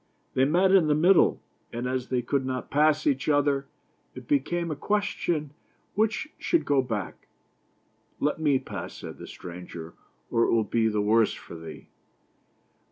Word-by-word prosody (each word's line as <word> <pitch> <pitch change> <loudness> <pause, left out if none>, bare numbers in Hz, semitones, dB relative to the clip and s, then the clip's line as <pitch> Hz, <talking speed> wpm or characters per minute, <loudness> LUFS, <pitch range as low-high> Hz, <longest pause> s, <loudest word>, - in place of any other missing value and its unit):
They 130 - +3
met 180 +6 +3
in 190 -5 +5
the 150 - +3
middle, 175 +4 +4 0.3
and 120 +2 -3
as 130 0 -2
they 125 -1 0
could 135 +2 0
not 130 -1 -4
pass 150 +1 +3
each 140 0 +1
other, 145 -1 +2 0.5
it - - -10
became 175 - 0
a - - -2
question 170 -4 -1 0.4
which 220 +7 0
should 340 - +1
go 140 -2 +3
back. 110 -6 -5 0.5
" - - -41
Let 150 - -5
me 145 -4 +3
pass," - - -7
said - - -9
the - - -8
stranger, 85 -2 -9 0.2
" - - -40
or 115 0 +3
it - - +1
will 115 -1 +3
be 110 +1 +1
the 105 -1 0
worse 110 +1 +3
for - - -12
thee." 80 -1 -9
140 Hz, 170 wpm, -27 LUFS, 115-160 Hz, 0.5 s, in